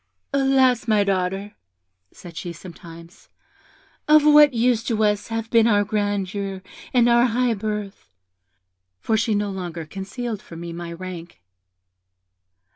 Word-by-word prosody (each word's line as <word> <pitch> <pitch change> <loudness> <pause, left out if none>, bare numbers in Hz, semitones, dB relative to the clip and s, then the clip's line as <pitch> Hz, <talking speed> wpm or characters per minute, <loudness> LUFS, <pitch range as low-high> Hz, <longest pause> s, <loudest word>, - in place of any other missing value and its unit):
'Alas! 265 -3 +2
my 215 -2 +3
daughter,' 195 +1 -2 0.6
said 170 -2 -13
she, 170 +1 -6
sometimes, 170 0 -13 0.8
'of 305 0 +5
what 295 -1 +7
use 235 -1 +1
to 220 -2 -1
us 210 -1 0
have 225 0 -4
been 230 -1 +5
our 205 -2 +3
grandeur 200 -2 -3 0.3
and 240 -2 +3
our 240 +1 +4
high 245 +1 +1
birth? 210 -1 -5 0.9
(for 220 - 0
she 220 0 +1
no 205 0 -1
longer 175 -4 -6
concealed 205 +5 -6
from 165 0 -11
me 170 0 -6
my 170 0 -7
rank.) 175 - -9
205 Hz, 130 wpm, -22 LUFS, 185-235 Hz, 0.9 s, what